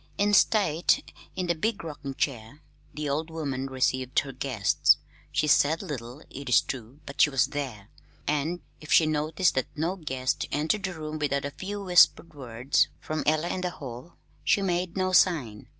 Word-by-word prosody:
In 205 Hz, +1 st, +2 dB
state, 190 Hz, -6 st, +3 dB, 0.2 s
in 185 Hz, -, -2 dB
the 170 Hz, -, +1 dB
big 205 Hz, +6 st, -2 dB
rocking 145 Hz, -4 st, -6 dB
chair, 130 Hz, +1 st, -3 dB, 0.3 s
the 150 Hz, 0 st, -4 dB
old 155 Hz, +3 st, -1 dB
woman 140 Hz, -5 st, -3 dB
received 130 Hz, -1 st, -1 dB
her 135 Hz, -, -8 dB
guests. 130 Hz, -6 st, +2 dB, 0.3 s
She -, -, +1 dB
said 150 Hz, +2 st, +3 dB
little, 125 Hz, 0 st, -7 dB
it 140 Hz, -1 st, -8 dB
is 120 Hz, -, +6 dB
true, 130 Hz, +3 st, -7 dB
but 140 Hz, -, -2 dB
she -, -, +6 dB
was 135 Hz, -2 st, +3 dB
there; 130 Hz, -8 st, -6 dB, 0.3 s
and 150 Hz, +4 st, -1 dB, 0.2 s
if 150 Hz, -, -10 dB
she 160 Hz, -, +6 dB
noticed 155 Hz, +3 st, +1 dB
that 130 Hz, -, 0 dB
no 165 Hz, +5 st, -1 dB
guest 130 Hz, -4 st, -2 dB
entered 160 Hz, +8 st, 0 dB
the 185 Hz, -2 st, -4 dB
room 155 Hz, 0 st, -5 dB
without 140 Hz, -1 st, 0 dB
a 140 Hz, -, -3 dB
few 200 Hz, +6 st, -6 dB
whispered 180 Hz, -2 st, +4 dB
words 125 Hz, -2 st, 0 dB
from 155 Hz, 0 st, -3 dB
Ella 155 Hz, +3 st, +2 dB
in 185 Hz, -, -2 dB
the 180 Hz, -, -1 dB
hall, 135 Hz, -1 st, -9 dB, 0.3 s
she 200 Hz, -, +2 dB
made 180 Hz, -1 st, -1 dB
no 185 Hz, 0 st, +1 dB
sign. 145 Hz, -, +2 dB
150 Hz, 180 wpm, -27 LUFS, 135-170 Hz, 0.3 s, is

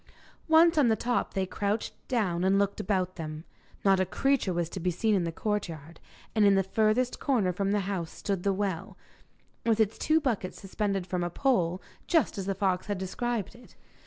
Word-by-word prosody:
Once 325 Hz, 0 st, +6 dB
on 275 Hz, -, +5 dB
the 220 Hz, -, +4 dB
top 245 Hz, +2 st, -1 dB
they 190 Hz, -1 st, +1 dB
crouched 205 Hz, +3 st, -2 dB
down 185 Hz, -8 st, 0 dB
and 190 Hz, +1 st, +3 dB
looked 200 Hz, +1 st, 0 dB
about 185 Hz, -3 st, -1 dB
them. 155 Hz, -1 st, -6 dB, 0.4 s
Not 195 Hz, -1 st, +5 dB
a 185 Hz, -, +2 dB
creature 270 Hz, -1 st, +1 dB
was 170 Hz, -1 st, -1 dB
to 190 Hz, -, -6 dB
be 180 Hz, +1 st, 0 dB
seen 215 Hz, +5 st, +1 dB
in 185 Hz, -4 st, +2 dB
the 165 Hz, -, -2 dB
courtyard, 165 Hz, -5 st, -4 dB, 0.3 s
and 215 Hz, -, +3 dB
in 200 Hz, -1 st, +6 dB
the 195 Hz, -, +3 dB
furthest 220 Hz, +5 st, +1 dB
corner 220 Hz, -10 st, +1 dB
from 195 Hz, +2 st, -1 dB
the 205 Hz, 0 st, +2 dB
house 185 Hz, -4 st, -3 dB
stood 195 Hz, +1 st, -3 dB
the 200 Hz, -, +1 dB
well, 190 Hz, -3 st, -3 dB, 0.7 s
with 225 Hz, -1 st, +2 dB
its 220 Hz, -1 st, +1 dB
two 315 Hz, +1 st, +3 dB
buckets 230 Hz, -11 st, -2 dB
suspended 195 Hz, -1 st, -2 dB
from 180 Hz, -1 st, -2 dB
a 175 Hz, -, -1 dB
pole, 180 Hz, -6 st, +1 dB, 0.2 s
just 310 Hz, -, +2 dB
as 190 Hz, -, -4 dB
the 195 Hz, -, 0 dB
fox 190 Hz, -1 st, 0 dB
had 205 Hz, -2 st, -1 dB
described 215 Hz, +4 st, -3 dB
it. 245 Hz, +1 st, -17 dB
195 Hz, 200 wpm, -28 LUFS, 185-220 Hz, 0.7 s, Once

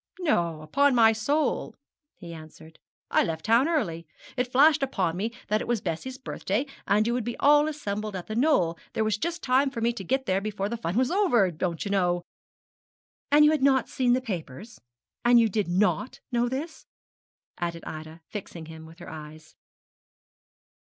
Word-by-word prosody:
'No, 170 Hz, -, 0 dB
upon 275 Hz, -, +2 dB
my 225 Hz, -2 st, +6 dB
soul,' 280 Hz, +8 st, -1 dB, 0.4 s
he 170 Hz, -1 st, -9 dB
answered; 160 Hz, 0 st, -13 dB, 0.3 s
'I -, -, +4 dB
left 160 Hz, -1 st, -4 dB
town 230 Hz, +6 st, +4 dB
early. 170 Hz, -, -1 dB, 0.3 s
It 250 Hz, -1 st, -1 dB
flashed 290 Hz, +4 st, +5 dB
upon 190 Hz, -11 st, -1 dB
me 215 Hz, +5 st, -2 dB, 0.2 s
that 215 Hz, +1 st, +1 dB
it -, -, -5 dB
was 240 Hz, -2 st, +1 dB
Bessie's 195 Hz, +10 st, -4 dB
birthday 250 Hz, -2 st, -2 dB, 0.4 s
you 235 Hz, -, 0 dB
would 245 Hz, -1 st, -1 dB
be 240 Hz, +1 st, -4 dB
all 295 Hz, +1 st, +5 dB
assembled 215 Hz, -9 st, -4 dB
at 180 Hz, -, -5 dB
The 215 Hz, -, -5 dB
Knoll 220 Hz, -, +2 dB
there 220 Hz, -, 0 dB
was 215 Hz, -1 st, 0 dB
just 340 Hz, +4 st, -3 dB
time 270 Hz, +2 st, +3 dB
for 260 Hz, -3 st, -6 dB
me 235 Hz, +1 st, +1 dB
to 205 Hz, -, -7 dB
get 265 Hz, +7 st, -1 dB
there 190 Hz, -2 st, +1 dB
before 205 Hz, -1 st, -3 dB
the 235 Hz, -, -3 dB
fun 185 Hz, -3 st, -3 dB
was 255 Hz, +3 st, +2 dB
over 290 Hz, -, +3 dB
don't 170 Hz, +2 st, -3 dB
you 200 Hz, -, -3 dB
know 175 Hz, -3 st, +1 dB, 0.5 s
' -, -, -62 dB
'And 300 Hz, +1 st, +7 dB
you 300 Hz, -, +6 dB
had 310 Hz, -3 st, 0 dB
not 265 Hz, -2 st, +3 dB
seen 250 Hz, -2 st, +2 dB
the 255 Hz, -, +1 dB
papers? 195 Hz, -, -7 dB, 0.4 s
you 240 Hz, -1 st, +5 dB
did 210 Hz, -2 st, -1 dB
not 180 Hz, +4 st, 0 dB
know 240 Hz, 0 st, +1 dB
this?' 295 Hz, +6 st, -6 dB, 0.7 s
added 170 Hz, -1 st, -3 dB
Ida, 155 Hz, +1 st, -8 dB
fixing 180 Hz, -5 st, -7 dB
him 160 Hz, 0 st, -11 dB
with 165 Hz, +1 st, -15 dB
her 175 Hz, -, -10 dB
eyes. 155 Hz, 0 st, -11 dB
215 Hz, 185 wpm, -26 LUFS, 175-260 Hz, 0.7 s, And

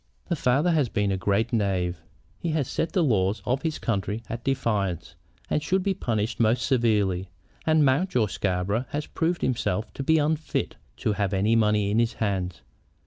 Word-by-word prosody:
"The 170 Hz, -, +1 dB
father 145 Hz, +4 st, +2 dB
has 150 Hz, -7 st, +2 dB
been 105 Hz, -3 st, 0 dB
a -, -, +1 dB
great 100 Hz, +5 st, 0 dB
knave. 90 Hz, -5 st, 0 dB, 0.4 s
He 170 Hz, -, -2 dB
has 150 Hz, -5 st, 0 dB
set 165 Hz, -, -2 dB
the 180 Hz, -, +3 dB
laws 100 Hz, -6 st, +2 dB
of 130 Hz, +2 st, 0 dB
his 160 Hz, -2 st, -2 dB
country 105 Hz, 0 st, -2 dB
at 120 Hz, +1 st, -5 dB
defiance, 105 Hz, -, -1 dB, 0.3 s
and 150 Hz, -, 0 dB
should 185 Hz, +5 st, 0 dB
be 200 Hz, 0 st, +1 dB
punished 115 Hz, -, -2 dB
most 115 Hz, +1 st, +2 dB
severely. 105 Hz, -8 st, +1 dB, 0.4 s
And 155 Hz, -2 st, +5 dB
Mountjoy 135 Hz, -, +2 dB
Scarborough 100 Hz, +4 st, -1 dB
has 150 Hz, +1 st, -3 dB
proved 170 Hz, +2 st, -1 dB
himself 115 Hz, -4 st, -1 dB
to -, -, -5 dB
be 160 Hz, +4 st, +3 dB
unfit 150 Hz, -1 st, -1 dB, 0.2 s
to 105 Hz, -, 0 dB
have 100 Hz, -1 st, -1 dB
any 105 Hz, +4 st, +2 dB
money 105 Hz, -2 st, +2 dB
in 110 Hz, -, +2 dB
his 115 Hz, 0 st, +1 dB
hands. 95 Hz, -5 st, -2 dB
115 Hz, 180 wpm, -26 LUFS, 100-145 Hz, 0.4 s, And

